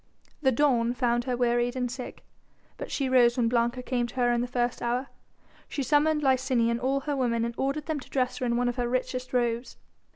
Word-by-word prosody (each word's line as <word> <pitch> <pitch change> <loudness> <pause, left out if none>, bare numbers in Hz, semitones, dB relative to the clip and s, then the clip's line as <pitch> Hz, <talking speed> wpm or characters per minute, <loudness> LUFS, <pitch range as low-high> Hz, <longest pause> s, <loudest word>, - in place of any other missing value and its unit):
The 265 -3 +3
dawn 245 -3 +2
found 240 -1 +1
her 250 -2 -1
wearied 240 0 +1
and 250 -2 -2
sick. 255 0 -8 0.5
But - - -6
she 275 - -1
rose 245 -1 +4
when 240 -2 +2
Blanca 240 +1 0
came 245 -2 -1
to 240 - -13
her 245 -1 +2
in 240 0 +1
the 245 - -2
first 245 -1 -1
hour. 245 +3 -1 0.6
She 280 - -2
summoned 300 +2 +2
Licinia 255 -3 +2
and 235 - -1
all 270 +2 0
her 290 +1 -2
women 235 -3 0
and 235 - -3
ordered 275 +4 -2
them 315 -2 -2
to 260 - -13
dress 255 -2 -1
her 255 - -1
in 235 0 +1
one 245 0 +1
of 245 - -2
her 240 -1 -1
richest 255 0 -2
robes. 240 -1 -1
250 Hz, 225 wpm, -27 LUFS, 240-265 Hz, 0.6 s, rose